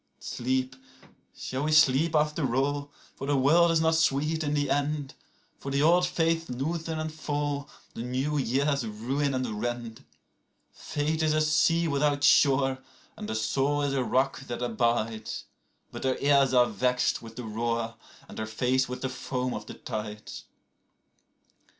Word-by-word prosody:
39Sleep, 130 Hz, +1 st, -2 dB, 0.6 s
shall 130 Hz, +2 st, -4 dB
we 155 Hz, -, 0 dB
sleep 155 Hz, +1 st, +4 dB
after 150 Hz, -4 st, +1 dB
all? 145 Hz, +1 st, -1 dB, 0.2 s
for 135 Hz, -, -6 dB
the 145 Hz, -1 st, +2 dB
world 165 Hz, +6 st, +5 dB
is 165 Hz, -1 st, +3 dB
not 160 Hz, 0 st, +3 dB
sweet 160 Hz, 0 st, +1 dB
in 145 Hz, 0 st, -1 dB
the 145 Hz, -1 st, +1 dB
end;40For 145 Hz, -1 st, -4 dB
the 140 Hz, +1 st, +1 dB
old 175 Hz, +3 st, +4 dB
faiths 165 Hz, -1 st, 0 dB
loosen 160 Hz, +6 st, -3 dB
and 155 Hz, 0 st, -4 dB
fall, 145 Hz, -2 st, -3 dB, 0.2 s
the -, -, -6 dB
new 130 Hz, +5 st, -2 dB
years 140 Hz, +2 st, +1 dB
ruin 130 Hz, +6 st, -2 dB
and 115 Hz, -5 st, -3 dB
rend.41Fate 120 Hz, +5 st, -5 dB
is 155 Hz, -1 st, +2 dB
a 155 Hz, -, +3 dB
sea 165 Hz, +2 st, +3 dB
without 145 Hz, -1 st, +1 dB
shore, 135 Hz, -2 st, +4 dB, 0.4 s
and 105 Hz, -, -7 dB
the 110 Hz, -, -2 dB
soul 140 Hz, +6 st, 0 dB
is 140 Hz, -1 st, 0 dB
a 135 Hz, -2 st, +1 dB
rock 130 Hz, +2 st, +1 dB
that 120 Hz, 0 st, -4 dB
abides;42But 115 Hz, -2 st, -3 dB
her 130 Hz, -1 st, +1 dB
ears 140 Hz, -2 st, +4 dB
are 125 Hz, -1 st, +5 dB
vexed 125 Hz, +3 st, 0 dB
with 115 Hz, -1 st, -11 dB
the 125 Hz, -, -6 dB
roar 115 Hz, +1 st, -2 dB, 0.3 s
and -, -, -9 dB
her 110 Hz, -, -3 dB
face 125 Hz, +4 st, 0 dB
with 125 Hz, -, -5 dB
the -, -, +1 dB
foam 125 Hz, 0 st, -3 dB
of 105 Hz, 0 st, -6 dB
the -, -, -8 dB
tides. 105 Hz, 0 st, -6 dB
135 Hz, 155 wpm, -28 LUFS, 125-150 Hz, 0.6 s, world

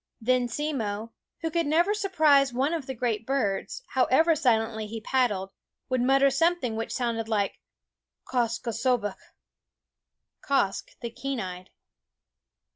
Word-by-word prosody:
Then 250 Hz, +1 st, +2 dB
Simmo, 230 Hz, -5 st, -3 dB, 0.3 s
who 325 Hz, -, -2 dB
could 335 Hz, -1 st, 0 dB
never 340 Hz, +7 st, +3 dB
surprise 310 Hz, -10 st, +3 dB
one 265 Hz, +6 st, 0 dB
of 315 Hz, -5 st, -3 dB
the 265 Hz, -, -4 dB
great 230 Hz, -3 st, -1 dB
birds, 260 Hz, -, -1 dB
however 290 Hz, +6 st, +3 dB
silently 225 Hz, -5 st, +1 dB
he 225 Hz, +1 st, -5 dB
pad 255 Hz, +2 st, +2 dB
dled, 195 Hz, -1 st, -4 dB, 0.4 s
would 255 Hz, -1 st, +1 dB
mutter 270 Hz, +2 st, +4 dB
something 300 Hz, -5 st, +1 dB
which 225 Hz, +1 st, -3 dB
sounded 230 Hz, -3 st, -2 dB
like 205 Hz, -3 st, 0 dB, 0.7 s
Quoskh 235 Hz, -2 st, -1 dB
K'sobeqh, 230 Hz, -3 st, 0 dB, 1.3 s
Quoskh 235 Hz, -9 st, 0 dB
the 235 Hz, -2 st, -4 dB
Keen 275 Hz, +2 st, -4 dB
Eyed. 185 Hz, -2 st, -6 dB
250 Hz, 130 wpm, -27 LUFS, 225-275 Hz, 1.3 s, mutter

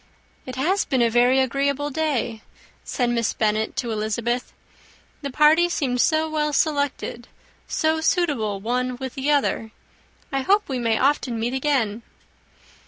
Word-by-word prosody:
"It 255 Hz, -, -6 dB
has 360 Hz, +10 st, +1 dB
been 260 Hz, -4 st, +1 dB
a 230 Hz, -, +2 dB
very 245 Hz, +3 st, +4 dB
agreeable 280 Hz, +3 st, 0 dB
day," 260 Hz, -7 st, -1 dB, 0.4 s
said 245 Hz, -2 st, -1 dB
Miss 235 Hz, -2 st, 0 dB
Bennet 215 Hz, 0 st, 0 dB
to 235 Hz, -3 st, -2 dB
Elizabeth. 225 Hz, +3 st, -2 dB, 0.7 s
"The 280 Hz, -, -4 dB
party 310 Hz, +5 st, +4 dB
seemed 255 Hz, -7 st, 0 dB
so 315 Hz, 0 st, +2 dB
well 300 Hz, -1 st, -1 dB
selected, 285 Hz, -5 st, -1 dB, 0.4 s
so 315 Hz, 0 st, 0 dB
suitable 285 Hz, -, 0 dB
one 250 Hz, +4 st, -1 dB
with 260 Hz, 0 st, -6 dB
the 270 Hz, +2 st, -2 dB
other. 280 Hz, -6 st, +1 dB, 0.6 s
I 270 Hz, -1 st, 0 dB
hope 405 Hz, +9 st, +2 dB
we 260 Hz, -3 st, -2 dB
may 230 Hz, -2 st, +1 dB
often 265 Hz, -4 st, +1 dB
meet 235 Hz, +3 st, -1 dB
again." 260 Hz, -6 st, 0 dB
260 Hz, 145 wpm, -23 LUFS, 235-295 Hz, 0.7 s, very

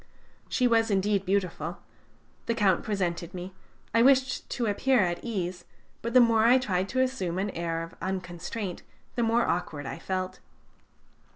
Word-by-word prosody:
She 250 Hz, -, +2 dB
was 225 Hz, -1 st, +3 dB
indeed 200 Hz, -1 st, +1 dB
beautiful. 180 Hz, -3 st, -1 dB, 0.7 s
The 230 Hz, -, +1 dB
Count 195 Hz, -5 st, +3 dB
presented 180 Hz, -4 st, -2 dB
me. 180 Hz, +1 st, -6 dB, 0.4 s
I 230 Hz, -, +5 dB
wished 260 Hz, 0 st, +3 dB
to 240 Hz, -, -1 dB
appear 240 Hz, +4 st, +3 dB
at 175 Hz, -2 st, -1 dB
ease, 185 Hz, -6 st, -3 dB, 0.4 s
but 235 Hz, +2 st, -4 dB
the -, -, +10 dB
more 230 Hz, -2 st, +5 dB
I 240 Hz, +3 st, +7 dB
tried 190 Hz, -6 st, -1 dB
to 260 Hz, -, +1 dB
assume 235 Hz, -10 st, -1 dB
an 200 Hz, +2 st, -1 dB
air 165 Hz, -1 st, -2 dB
of 165 Hz, -, -9 dB
unconstraint, 185 Hz, +1 st, -4 dB, 0.3 s
the 240 Hz, -, -1 dB
more 230 Hz, +1 st, +3 dB
awkward 155 Hz, -4 st, -2 dB
I -, -, -5 dB
felt. 185 Hz, -1 st, -3 dB
195 Hz, 160 wpm, -28 LUFS, 180-230 Hz, 0.7 s, the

